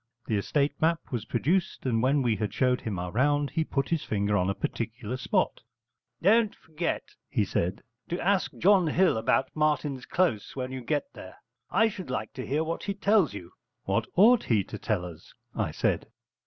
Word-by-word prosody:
The 110 - -1
estate 140 +8 +1
map 165 +1 +3
was 115 -4 -3
produced, 165 +12 0
and 115 -3 +1
when 135 +2 +2
we 115 -3 +2
had 105 +1 -2
showed 125 -1 +2
him 105 -4 -3
our 90 0 -4
round, 145 +6 +2
he 160 +1 +1
put 140 -3 -2
his 165 -3 0
finger 100 -1 0
on 90 -1 +2
a 100 - -1
particular 115 +1 -4
spot. 185 - 0 0.6
'Don't 215 +3 +4
forget,' 160 +2 -4 0.2
he - - +1
said, 90 +2 -2 0.3
'to 175 - -2
ask 195 0 +1
John 190 -2 +4
Hill 180 +1 +3
about 125 +4 +1
Martin's 150 -3 0
Close 170 - 0
when 130 -1 -4
you 130 -1 -5
get 145 +4 -2
there. 95 - -11 0.3
I 225 - +4
should 190 -4 -6
like - - -3
to 130 - -6
hear 150 +4 +1
what 165 +1 -4
he 200 -1 -2
tells 200 - +3
you.' 90 -3 -9 0.3
'What - - 0
ought 225 +5 +6
he 110 -5 +2
to 105 - -8
tell 100 -5 -1
us?' 85 -3 -11 0.2
I - - -1
said. - - -1
140 Hz, 195 wpm, -28 LUFS, 110-170 Hz, 0.6 s, ought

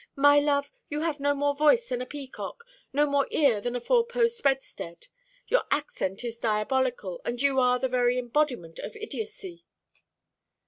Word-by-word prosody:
'My 285 +1 +6
love, 285 -1 +1 0.2
you 295 0 -2
have 315 -3 -1
no 285 +1 +1
more 285 0 +1
voice 305 +12 +4
than 250 -1 -2
a 255 - -5
peacock, 290 - -7 0.3
no 290 +2 +3
more 280 -1 +1
ear 265 -9 +3
than 245 +3 -3
a - - 0
four 475 - +3
post 470 -1 0
bedstead; 265 -11 -2 0.4
your - - +3
accent 200 -9 -2
is 235 -1 -5
diabolical, 220 -3 0
and 240 0 -3
you 275 0 +3
are 250 -1 +4
the 260 - 0
very 250 -1 +2
embodiment 245 - -1
of - - -7
idiotcy.' 425 -5 -7
280 Hz, 170 wpm, -27 LUFS, 245-300 Hz, 0.4 s, My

